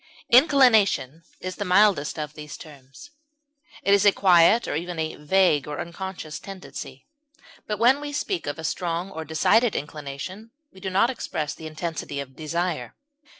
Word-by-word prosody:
Inclination 235 - +4 0.2
is 185 0 -5
the 205 - -2
mildest 185 -6 +3
of 150 -1 -5
these 150 -1 -9
terms; 145 - -14 0.7
it 200 - +3
is 200 -1 +4
a 205 - +7
quiet, 190 +4 +4
or - - -2
even 175 +2 -4
a 160 0 -2
vague 150 -2 +2
or 150 -1 -5
unconscious, 170 -3 -6
tendency. 185 -8 -9 0.6
Even 210 - -2
when 250 +6 +4
we 295 0 -5
speak 345 +6 -3
of 145 - -3
a 160 - -8
strong 175 +2 -2
or 160 - -6
decided 205 +9 +2
inclination 150 +8 -6 0.2
we 190 - -14
do 190 - -4
not 200 +7 +3
express 155 - -4
the 160 - -9
intensity 155 -2 -5
of 135 -1 -8
desire. 170 +2 -3
175 Hz, 160 wpm, -24 LUFS, 150-205 Hz, 0.7 s, a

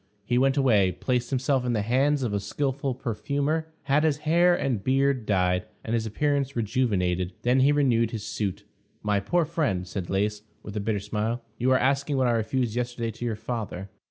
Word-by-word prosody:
He 120 +2 +2
went 135 +1 +2
away, 105 -9 +4
placed 125 +6 -1
himself 130 0 +1
in 125 -1 0
the 105 -3 0
hands 135 +5 +2
of 115 -4 -1
a 100 - +1
skillful 135 +5 -2
perfumer, 145 +6 -2
had 140 +2 +2
his 155 -3 +2
hair 175 +3 +4
and 130 - -1
beard 135 -3 +1
dyed, 90 -2 +1 0.2
and 115 - -3
his 115 -1 0
appearance 140 +3 0
rejuvenated. 100 -6 0
Then 125 +2 +3
he 135 +2 +5
renewed 125 -6 +3
his 110 -2 -5
suit. 105 -3 -3 0.4
"My 105 -1 +2
poor 165 - +1
friend," 140 - -1
said 90 -1 -5
Lais, 105 +2 0 0.2
with 105 - -8
a - - 0
bitter 105 0 -1
smile, 110 +4 -2 0.2
"you 125 - +2
are 130 - +5
asking 140 +2 +1
what 130 - +2
I 120 - +3
refused 115 +1 0
yesterday 120 -1 -2
to 115 +2 -7
your 115 -2 -1
father." 105 -4 -5
120 Hz, 195 wpm, -26 LUFS, 105-135 Hz, 0.4 s, he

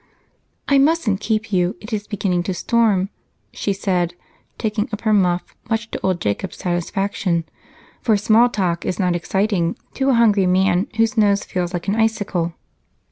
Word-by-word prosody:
"I 280 -1 +4
mustn't 275 -9 +2
keep 215 0 -2
you 180 0 +2
it 215 +3 -9
is 210 -1 -3
beginning 190 -4 0
to 185 - -1
storm," 210 -2 +2 0.4
she 200 - -2
said, 180 -3 -1 0.4
taking 215 +1 -1
up 210 - -4
her 215 -1 +2
muff, 180 -3 +1
much 225 0 -2
to - - -4
old 185 -2 0
Jacob's 105 - -2
satisfaction, 180 0 -1 0.6
for 220 -3 +3
small 225 +4 +4
talk 180 -6 -1
is 185 - -2
not 180 -3 +1
exciting 190 -1 0 0.2
to 270 0 0
a 265 - +4
hungry 210 -5 +4
man 185 +1 +2
whose 225 0 +2
nose 205 -2 +3
feels 180 -1 -3
like 175 0 -4
an 200 +3 +1
icicle. 205 -7 0
200 Hz, 165 wpm, -20 LUFS, 180-220 Hz, 0.6 s, I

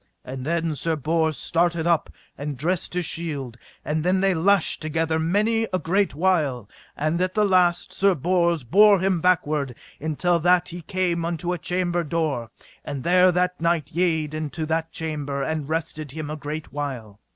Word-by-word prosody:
And 130 0 -6
then 165 -1 0
Sir 160 +3 0
Bors 160 0 0
started 170 +1 +1
up 170 -2 +2 0.3
and 145 -1 -5
dressed 175 +5 -1
his 180 -1 0
shield; 145 -8 -4 0.3
and 150 +1 -1
then 185 +2 +2
they 195 0 +3
lashed 185 +2 +2
together 160 +1 0
mightily 215 +7 +1
a 185 - +1
great 185 +2 0
while; 150 - +1 0.3
and 155 +4 0
at 185 0 -1
the 210 -1 +3
last 180 -3 +2
Sir 195 -1 +3
Bors 170 0 +1
bare 200 - +6
him 185 -2 0
backward 150 -7 +1 0.2
until 170 +3 0
that 180 +1 +3
he 175 0 -7
came 175 0 -1
unto 170 +1 -2
a 175 - -4
chamber 175 0 -1
door, 150 -8 -2 0.3
and 135 -3 -5
there 180 +1 +5
that 180 0 0
knight 165 -3 0
yede 160 -4 0
into 155 +1 -3
that 160 +1 -1
chamber 145 -3 -3
and 155 0 -3
rested 155 -2 -3
him 150 +2 -6
a - - -3
great 150 +1 -6
while. 125 -8 -5
165 Hz, 175 wpm, -24 LUFS, 150-180 Hz, 0.3 s, bare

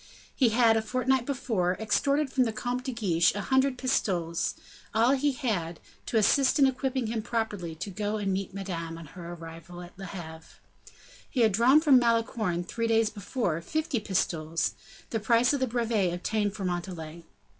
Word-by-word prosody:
He 255 -4 +4
had, 225 0 +4
a - - +1
fortnight 255 +2 0
before, 215 -10 0
extorted 275 +6 +1
from 255 -2 +3
the 225 - -1
Comte 245 +3 -3
de 265 - -2
Guiche 185 -8 +2
a 205 - -2
hundred 265 +2 +2
pistoles, 180 -11 0 0.4
all 230 +3 +4
he 280 +1 +2
had, 200 - -2 0.3
to 230 - 0
assist 260 +7 +4
in 280 - +6
equipping 265 -1 0
him 220 0 -2
properly 210 -7 -3
to 180 +5 -6
go 210 +2 -2
and 200 -2 -1
meet 195 +1 -3
Madame, 170 -4 -5
on 165 - -9
her 170 +3 -9
arrival 165 +1 -10
at 175 - -13
Le 195 - -6
Havre. 160 -3 -9 0.7
He 255 - 0
had 220 -2 +5
drawn 245 +9 +5
from 285 -5 +6
Malicorne, 230 -6 0
three 230 +6 -2
days 225 -1 +3
before, 200 -5 -2
fifty 310 - -1
pistoles, 165 -5 -1 0.4
the 225 - 0
price 235 +4 +3
of 285 - 0
the 260 - +1
brevet 230 -6 0
obtained 205 +3 -1
for 200 -3 -4
Montalais. 170 -2 -5
220 Hz, 175 wpm, -28 LUFS, 175-250 Hz, 0.7 s, in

